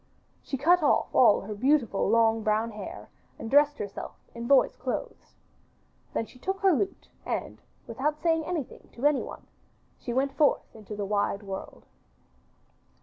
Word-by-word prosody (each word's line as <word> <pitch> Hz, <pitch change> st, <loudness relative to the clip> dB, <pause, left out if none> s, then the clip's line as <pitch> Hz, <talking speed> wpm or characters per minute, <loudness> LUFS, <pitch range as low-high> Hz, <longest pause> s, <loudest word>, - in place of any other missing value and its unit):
She 270 Hz, -, -4 dB
cut 340 Hz, +6 st, +4 dB
off 295 Hz, -, +2 dB
all 235 Hz, -5 st, +6 dB
her 210 Hz, +2 st, -6 dB
beautiful 240 Hz, -3 st, +2 dB
long 225 Hz, 0 st, +3 dB
brown 215 Hz, +2 st, 0 dB
hair 330 Hz, -, -8 dB, 0.3 s
and 225 Hz, -, -7 dB
dressed 290 Hz, +1 st, +5 dB
herself 200 Hz, -1 st, -6 dB, 0.2 s
in 235 Hz, 0 st, -6 dB
boy's 275 Hz, 0 st, +4 dB
clothes. 250 Hz, 0 st, -5 dB, 0.8 s
Then 225 Hz, -, 0 dB
she 250 Hz, -, -18 dB
took 385 Hz, +7 st, -3 dB
her 385 Hz, -2 st, +5 dB
lute 390 Hz, +6 st, -2 dB, 0.2 s
and, -, -, -4 dB, 0.2 s
without 290 Hz, +6 st, -2 dB
saying 325 Hz, 0 st, +1 dB
anything 315 Hz, -4 st, -5 dB
to 245 Hz, -, -5 dB
anyone, 295 Hz, -2 st, 0 dB, 0.5 s
she 245 Hz, -, -5 dB
went 270 Hz, +3 st, 0 dB
forth 295 Hz, -6 st, +2 dB
into 215 Hz, -1 st, -8 dB
the 205 Hz, -1 st, -3 dB
wide 200 Hz, 0 st, 0 dB
world. 195 Hz, -1 st, -7 dB
255 Hz, 150 wpm, -28 LUFS, 220-300 Hz, 0.8 s, all